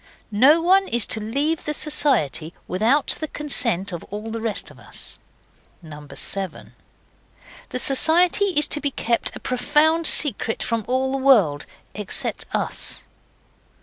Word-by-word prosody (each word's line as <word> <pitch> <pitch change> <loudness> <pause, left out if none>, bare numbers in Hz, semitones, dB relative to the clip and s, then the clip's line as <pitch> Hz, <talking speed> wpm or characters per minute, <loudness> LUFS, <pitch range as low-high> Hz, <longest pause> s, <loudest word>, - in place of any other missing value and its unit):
No 285 +10 +5
one 385 +2 +4
is 235 -2 +1
to 220 - +1
leave 280 +9 -2
the 300 - -2
Society 225 - 0
without 230 +10 +1
the 310 - -3
consent 235 - -2
of 170 -2 -6
all 210 +2 -7
the 225 0 -5
rest 225 -2 -3
of - - -17
us. - - -9 0.7
7. 155 +5 -5 1.0
The - - -3
Society 330 +9 +3
is 325 -7 +2
to 295 - +1
be 285 - 0
kept 235 -3 -1
a - - -8
profound 300 +6 +2
secret 230 -5 +2
from 230 -2 -2
all 260 +1 0
the 270 - -1
world 210 - +3 0.3
except 205 -1 -3
us. - - -3
255 Hz, 140 wpm, -22 LUFS, 210-300 Hz, 1.0 s, No